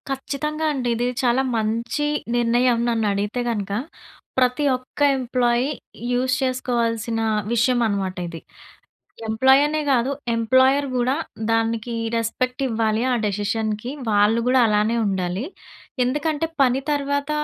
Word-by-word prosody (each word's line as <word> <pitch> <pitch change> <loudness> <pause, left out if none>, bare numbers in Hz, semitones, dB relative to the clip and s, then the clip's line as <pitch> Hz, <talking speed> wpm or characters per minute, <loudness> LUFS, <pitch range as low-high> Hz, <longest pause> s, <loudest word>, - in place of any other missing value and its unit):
కచ్చితంగా 300 +3 -3
అండి. 255 -3 -2
ఇది 240 +2 0 0.2
చాలా 245 +1 +3 0.2
మంచి, 230 +6 -1 0.3
నిర్ణయం 240 +1 +3
నన్ను 225 -2 0
అడిగితే 205 +5 -2
గనక. 205 -4 -3 0.7
ప్రతి 255 +2 +2
ఒక్క 255 +3 -16 0.2
ఎంప్లాయీ 245 -1 +1 0.5
యూజ్ 255 +1 +1
చేసుకోవాల్సిన 235 -3 -1 0.3
విషయమనమాట 225 -6 +1
ఇది. 165 -1 -7 0.9
ఎంప్లాయీ 265 +5 +5
అనే 310 +1 -1
గాదు. 255 0 +2 0.3
ఎంప్లాయర్ 260 +5 +3
గూడా 250 +1 +1 0.4
దానికి 225 +1 0 0.2
రెస్పెక్ట్ 250 +3 -1
ఇవ్వాలి, 220 -1 0
ఆ - - +3
డెసిషన్‌కి 210 +3 -2 0.2
వాళ్ళు 210 +2 +3
గూడా 255 +1 +4
అలానే 215 +2 +2
ఉండాలి. 190 +2 -1 0.6
ఎందుకంటే 295 +4 -1 0.2
పని 260 0 +3
తర్వాత 285 0 -1
240 Hz, 115 wpm, -22 LUFS, 220-260 Hz, 0.9 s, ఎంప్లాయీ